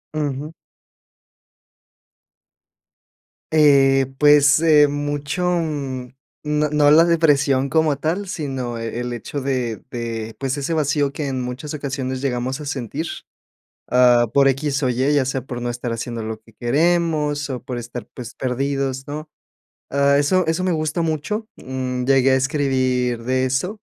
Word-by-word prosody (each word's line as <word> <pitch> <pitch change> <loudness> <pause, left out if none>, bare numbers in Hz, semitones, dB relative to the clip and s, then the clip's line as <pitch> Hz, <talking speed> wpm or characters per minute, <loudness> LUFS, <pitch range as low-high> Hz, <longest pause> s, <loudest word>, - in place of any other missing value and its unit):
Ujú. 150 0 -3 3.0
Eh, 135 -3 +5
pues, 145 0 +6
eh, 155 -2 +5
mucho, 145 +4 -3
mm, 145 -7 -2 0.4
no 150 0 0
no 150 -1 +4
la 160 +2 +7
depresión 140 -5 +2
como 155 0 +2
tal, 170 +8 -2
sino 135 -9 -4
eh, 115 +1 -4
el 125 0 -3
hecho 120 +4 -5
de 130 -5 -2
de, 115 -2 -5
pues, 135 +1 -2
ese 145 +4 -2
vacío 145 -2 +1
que 150 -1 -3
en 130 -2 -2
muchas 125 +5 -5
ocasiones 135 -2 -4
llegamos 130 0 -2
a 150 - -7
sentir, 140 +2 -4 0.8
ah, 125 -1 +5
por 140 -1 +5
x 135 +1 0
o 130 - +2
y, 130 +4 +1
ya 145 -2 +3
sea 135 0 -2
por 120 -2 -6
no 120 - -2
estar 120 0 -4
haciendo 115 0 -4
lo 110 0 -5
que 115 0 -21
queremos 150 +3 +1
o 125 - -5
por 125 -1 -5
estar, 120 0 -7
pues 125 -2 -8
perdidos, 135 +1 -2
¿no? 150 +2 -6 0.6
Ah, 140 0 +3
eso 180 +6 +2
eso 165 +3 0
me 185 - +1
gusta 155 +1 -1
mucho. 165 +8 -2
Mm, 130 -1 -4
llegué 135 0 +4
a - - +5
escribir 130 -3 0
de 130 +1 +1
eso, 180 - -2
140 Hz, 150 wpm, -21 LUFS, 125-150 Hz, 3.0 s, la